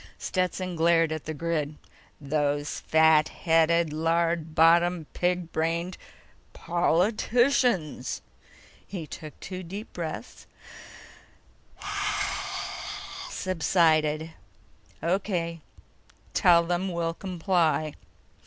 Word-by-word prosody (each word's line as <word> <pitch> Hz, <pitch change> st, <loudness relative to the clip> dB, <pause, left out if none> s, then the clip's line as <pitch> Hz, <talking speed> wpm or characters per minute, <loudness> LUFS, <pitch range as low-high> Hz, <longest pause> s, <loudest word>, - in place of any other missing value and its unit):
Stetson 185 Hz, -1 st, -2 dB
glared 165 Hz, -1 st, +3 dB
at 155 Hz, -1 st, -4 dB
the 155 Hz, -, -3 dB
grid. 155 Hz, -1 st, -2 dB, 0.4 s
"Those 145 Hz, 0 st, -1 dB
fat 160 Hz, -1 st, +4 dB
headed, 165 Hz, -1 st, +2 dB
lard 165 Hz, 0 st, 0 dB
bottomed, 170 Hz, 0 st, +4 dB
pig 180 Hz, -1 st, -1 dB
brained... 170 Hz, +3 st, -1 dB, 0.6 s
POLITICIANS!" 200 Hz, -, +1 dB, 0.6 s
He 180 Hz, -5 st, -5 dB
took 155 Hz, 0 st, -9 dB
two 185 Hz, -1 st, -6 dB
deep 195 Hz, +5 st, -8 dB
breaths, 165 Hz, -3 st, -6 dB, 2.8 s
subsided. 160 Hz, -3 st, +1 dB, 0.7 s
"O.K. 170 Hz, -2 st, -1 dB, 0.7 s
Tell 170 Hz, -1 st, +5 dB
them 175 Hz, +2 st, -1 dB
we'll 170 Hz, -1 st, -1 dB
comply." 170 Hz, -4 st, 0 dB
170 Hz, 80 wpm, -27 LUFS, 160-180 Hz, 2.8 s, Tell